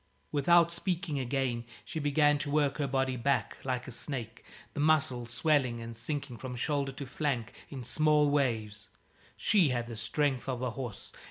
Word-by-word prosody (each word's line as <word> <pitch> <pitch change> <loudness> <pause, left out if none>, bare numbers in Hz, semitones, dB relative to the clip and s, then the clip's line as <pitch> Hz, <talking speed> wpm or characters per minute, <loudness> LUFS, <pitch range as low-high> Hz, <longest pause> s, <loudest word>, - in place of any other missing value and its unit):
Without 170 +4 +5
speaking 170 -3 -1
again, 130 -2 -1 0.2
she 165 - -4
began 145 0 +3
to 145 0 -2
work 145 0 +1
her 145 - +1
body 135 -1 0
back, 135 +3 0
like 125 -2 -2
a - - -6
snake, 120 -2 -6 0.3
the - - -5
muscles 145 -6 +2
swelling 130 -2 +2
and 115 0 -7
sinking 135 +1 -4
from 130 -1 -5
shoulder 140 +2 0
to 140 - -6
flank 130 -4 -2 0.2
in 135 -3 -6
small 150 +3 +3
waves. 110 -7 0 0.5
She 190 -8 +4
had 120 -2 -1
the 120 -1 -7
strength 135 +3 0
of 125 -1 -2
a 125 - 0
horse. 120 -5 -7
135 Hz, 170 wpm, -31 LUFS, 120-150 Hz, 0.5 s, Without